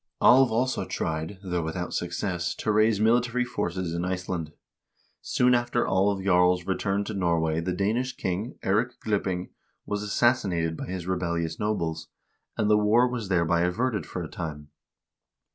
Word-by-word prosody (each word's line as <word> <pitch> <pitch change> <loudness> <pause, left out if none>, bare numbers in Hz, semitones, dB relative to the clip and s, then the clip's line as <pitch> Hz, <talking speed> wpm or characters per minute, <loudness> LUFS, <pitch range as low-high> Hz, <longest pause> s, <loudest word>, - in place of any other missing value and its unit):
Alv 130 -1 +6
also 125 +3 0
tried, 80 +5 -3
though 90 -2 -1
without 85 +2 -4
success, 90 0 -2
to 110 - -1
raise 110 0 +3
military 120 +2 +2
forces 90 -7 -3
in 85 +1 -2
Iceland. 90 -3 -3 0.7
Soon 125 0 +2
after 120 0 +1
Alv 95 +1 +1
Jarl's 90 -1 +3
return 100 +1 0
to 110 - -5
Norway 85 -4 +1
the 90 +2 -2
Danish 115 +7 -1
king, 95 +7 -3
Eirik 110 +6 0
Glipping, 95 -4 -1 0.3
was 105 0 -2
assassinated 100 -7 +1
by - - -6
his 90 -1 -5
rebellious 85 -3 -2
nobles, 85 -7 -2 0.5
and 105 - +1
the 105 0 +5
war 110 +4 +4
was 120 -5 -4
thereby 85 -2 +2
averted 105 +2 0
for - - -5
a - - -5
time. 75 -3 -6
95 Hz, 150 wpm, -26 LUFS, 85-110 Hz, 0.7 s, Alv